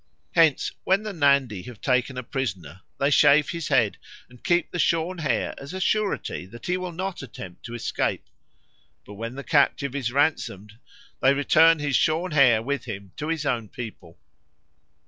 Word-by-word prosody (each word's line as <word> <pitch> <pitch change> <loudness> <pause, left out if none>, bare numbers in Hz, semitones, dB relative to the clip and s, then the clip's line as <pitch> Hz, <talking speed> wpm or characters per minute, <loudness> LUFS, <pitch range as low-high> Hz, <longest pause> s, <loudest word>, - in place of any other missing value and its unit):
Hence 160 -4 +3
when 195 +3 +2
the 215 -1 -5
Nandi 140 - +2
have 120 -4 -10
taken 130 0 0
a 125 - -4
prisoner 95 - -5 0.2
they 140 +1 +2
shave 145 +1 +5
his 170 -2 -4
head 125 -9 +2 0.3
and 125 -1 -18
keep 175 -1 +1
the 175 - -4
shorn 170 +2 +1
hair 150 -3 -1
as 140 +6 -8
a - - -4
surety 200 - -1
that 120 +5 -12
he 180 - 0
will 185 -1 -4
not 185 +2 -4
attempt 95 -8 -10
to 120 0 -6
escape; 120 - -2 0.8
but 105 - -11
when 115 +4 -6
the 140 - -6
captive 140 -2 +2
is 130 -4 -2
ransomed, 115 -7 -1 0.4
they 135 +1 +4
return 160 +3 +5
his 145 -2 -1
shorn 165 +3 +1
hair 130 -7 +5
with 140 +3 -3
him 100 -5 -7
to 150 - -4
his 160 -2 -2
own 115 -7 -1
people. 105 -8 -9
140 Hz, 175 wpm, -25 LUFS, 115-160 Hz, 0.8 s, shave